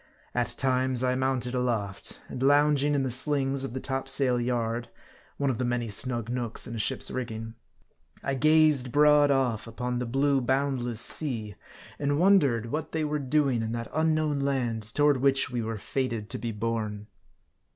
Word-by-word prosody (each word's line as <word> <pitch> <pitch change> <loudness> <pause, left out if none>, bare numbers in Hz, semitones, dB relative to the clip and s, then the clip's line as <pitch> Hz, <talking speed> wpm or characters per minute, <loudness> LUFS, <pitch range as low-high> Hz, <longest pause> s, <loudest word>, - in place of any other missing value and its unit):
At 120 -1 -1
times, 130 -1 +2
1 125 0 +1
mounted 130 -2 -1
aloft, 115 -6 -2
and 125 - -7
lounging 145 +1 +3
in 140 - +1
the 130 - -2
slings 135 +1 +1
of 130 -2 -5
the - - -2
topsail 135 -2 +1
yard 120 -1 -2 0.5
one 140 -1 +1
of 115 - -5
the - - 0
many 120 -2 -2
snug 120 +1 0
nooks 120 -2 -2
in 120 - -7
a - - -4
ship's 130 +4 +1
rigging 115 -3 -5 0.7
I 140 - -1
gazed 155 -2 +3
broad 150 +1 +5
off 130 -5 0
upon 125 +2 -3
the 125 - -3
blue 135 +2 +1
boundless 125 -3 -1
sea, 115 -5 0 0.5
and 145 0 0
wondered 140 - +3
what 155 0 -4
they 160 -1 0
were 150 0 -1
doing 135 -3 +1
in 110 0 -3
that 115 0 -5
unknown 155 -2 +1
land, 130 -5 -1
toward 145 -1 +4
which 135 0 +2
we 120 -1 -2
were 115 0 -4
fated 115 -2 -3
to - - -2
be 115 +1 -3
borne. 105 -1 -3
130 Hz, 170 wpm, -27 LUFS, 115-140 Hz, 0.7 s, broad